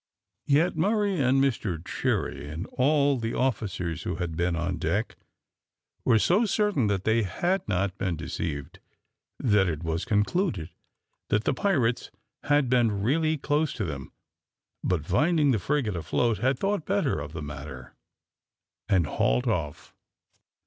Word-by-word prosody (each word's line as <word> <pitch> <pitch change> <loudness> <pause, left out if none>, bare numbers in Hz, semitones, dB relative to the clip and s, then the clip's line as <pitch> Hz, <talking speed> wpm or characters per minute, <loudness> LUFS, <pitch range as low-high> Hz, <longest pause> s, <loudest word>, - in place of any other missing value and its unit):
Yet 160 +6 +3
Murray 200 +2 +1
and 130 +1 +3
Mr 115 -10 0
Cherry, 70 - -2
and 80 +5 -5
all 140 +1 +3
the 115 0 -3
officers 100 - -1
who - - -3
had 85 -2 -3
been 85 +1 0
on 85 +1 -2
deck, 95 +8 -1 0.9
were 115 - +4
so 180 - +3
certain 205 - +1
that 100 -2 0
they 110 +2 +3
had 175 - -1
not 95 -1 0
been 90 -4 -1
deceived, 75 -2 -5 0.6
that 105 -6 +3
it 80 0 -4
was 80 +1 -1
concluded 105 - 0 0.6
that 105 +1 +2
the - - +1
pirates 130 - +1 0.4
had 145 -2 +3
been 115 -5 +2
really 155 +6 +2
close 150 +1 0
to 105 - -3
them, 70 -5 -6 0.7
but 85 -5 0
finding 150 - +3
the 115 - +1
frigate 125 -3 0
afloat, 110 +5 0
had 130 +4 +1
thought 195 +2 -1
better 195 - +1
of 70 +1 -7
the 80 -2 -5
matter 70 -3 -8 1.0
and 95 -5 +3
hauled 60 -3 +1
off. 75 -3 -3
110 Hz, 145 wpm, -27 LUFS, -, 1.0 s, were